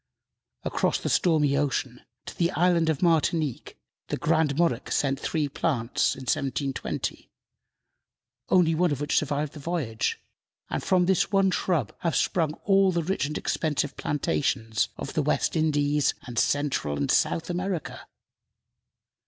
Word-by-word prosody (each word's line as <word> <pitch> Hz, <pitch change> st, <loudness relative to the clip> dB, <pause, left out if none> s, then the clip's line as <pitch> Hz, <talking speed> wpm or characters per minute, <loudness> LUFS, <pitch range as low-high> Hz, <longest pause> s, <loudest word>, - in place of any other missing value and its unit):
Across -, -, 0 dB
the -, -, -2 dB
stormy 150 Hz, -5 st, +3 dB
ocean, 135 Hz, -3 st, -1 dB, 0.2 s
to -, -, -8 dB
the 170 Hz, -1 st, +1 dB
Island 170 Hz, 0 st, +3 dB
of 160 Hz, +1 st, -1 dB
Martinique, 160 Hz, -5 st, +1 dB, 0.3 s
the -, -, -2 dB
Grand 155 Hz, -3 st, +1 dB
Monarch 165 Hz, -8 st, 0 dB
sent 135 Hz, -1 st, +1 dB
three 155 Hz, -1 st, -1 dB
plants 135 Hz, -5 st, 0 dB
in 135 Hz, -, -10 dB
1720, 135 Hz, +1 st, -2 dB, 1.2 s
only 175 Hz, -3 st, +4 dB
one 175 Hz, +1 st, +2 dB
of 145 Hz, -, -2 dB
which 145 Hz, 0 st, -1 dB
survived 150 Hz, 0 st, -2 dB
the 150 Hz, -, -9 dB
voyage, 140 Hz, -8 st, -2 dB, 0.5 s
and -, -, -1 dB
from 180 Hz, -1 st, +3 dB
this 190 Hz, +2 st, +2 dB
one 195 Hz, -1 st, +3 dB
shrub 160 Hz, -, -1 dB
have 170 Hz, -2 st, -1 dB
sprung 160 Hz, -4 st, +1 dB
all 195 Hz, -1 st, +4 dB
the 170 Hz, -2 st, -1 dB
rich 165 Hz, -4 st, -1 dB
and 150 Hz, -, -4 dB
expensive 150 Hz, -3 st, -1 dB
plantations 120 Hz, -6 st, -1 dB
of -, -, -6 dB
the -, -, +1 dB
West -, -, 0 dB
Indies 150 Hz, -2 st, +2 dB
and 120 Hz, -2 st, -2 dB
Central 140 Hz, -, 0 dB
and 70 Hz, -1 st, 0 dB
South 165 Hz, +1 st, +1 dB
America. 180 Hz, -2 st, -4 dB
150 Hz, 145 wpm, -26 LUFS, 140-170 Hz, 1.2 s, only